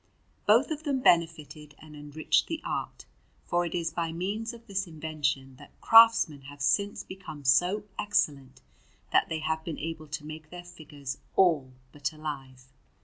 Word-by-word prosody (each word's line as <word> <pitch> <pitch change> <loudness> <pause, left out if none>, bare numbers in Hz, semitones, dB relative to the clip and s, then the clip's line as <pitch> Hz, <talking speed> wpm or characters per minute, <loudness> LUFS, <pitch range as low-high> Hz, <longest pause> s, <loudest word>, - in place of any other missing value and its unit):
Both 230 +9 +5
of 305 -1 -3
them 285 -4 -1
benefited 155 - +1
and 155 -1 -13
enriched 150 +1 0
the 325 -1 -3
art; - - -4 0.4
for 175 0 0
it 170 - -5
is 165 -2 -2
by 165 -1 -2
means 200 +7 -3
of 235 -1 -13
this 195 -3 -2
invention 145 -5 -3
that - - -16
craftsmen 225 -10 +6
have 145 0 -12
since 140 +9 +1
become 180 -7 -10
so 180 +11 +3 0.2
excellent, 140 -10 0 0.5
that - - +3
they 160 -1 -2
have 160 +1 -1
been 160 -2 -5
able 160 0 -5
to 150 0 -6
make 155 0 -9
their 175 +1 -9
figures 145 -6 -8 0.2
all 160 -9 +3 0.2
but 140 -1 -3
alive. 135 -4 -7
160 Hz, 160 wpm, -28 LUFS, 145-185 Hz, 0.5 s, craftsmen